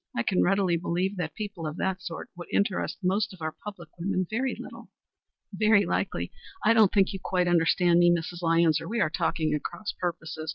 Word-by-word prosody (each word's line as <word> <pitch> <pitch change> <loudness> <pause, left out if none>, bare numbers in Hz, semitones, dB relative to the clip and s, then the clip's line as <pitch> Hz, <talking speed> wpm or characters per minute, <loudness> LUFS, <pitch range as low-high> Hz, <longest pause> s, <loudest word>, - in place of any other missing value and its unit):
I 115 - +1
can 185 - +2
readily 190 -2 +2
believe 180 +3 -1
that 160 -4 -3
people 200 -7 -5
of 155 +2 -5
that 190 -1 -1
sort 170 -3 -7
would 175 0 -9
interest 200 -1 0
most 195 +3 +1
of - - -20
our 155 - -1
public 190 -6 -8
women 185 +1 0
very 255 +6 -1
little." - - -10 0.6
"Very 210 +1 +4
likely. - - -2 0.3
I 225 - +6
don't 220 -4 +5
think 195 0 +3
you 195 - -5
quite 180 -1 +1
understand 175 0 +4
me, 175 0 +6
Mrs. 175 +1 -2
Lyons, 165 -1 +3
or - - -7
we 230 +4 -2
are 155 - +2
talking 155 -1 0
at 150 - -1
cross 205 +4 -5
purposes. 160 -3 -4
180 Hz, 205 wpm, -27 LUFS, 165-200 Hz, 0.6 s, I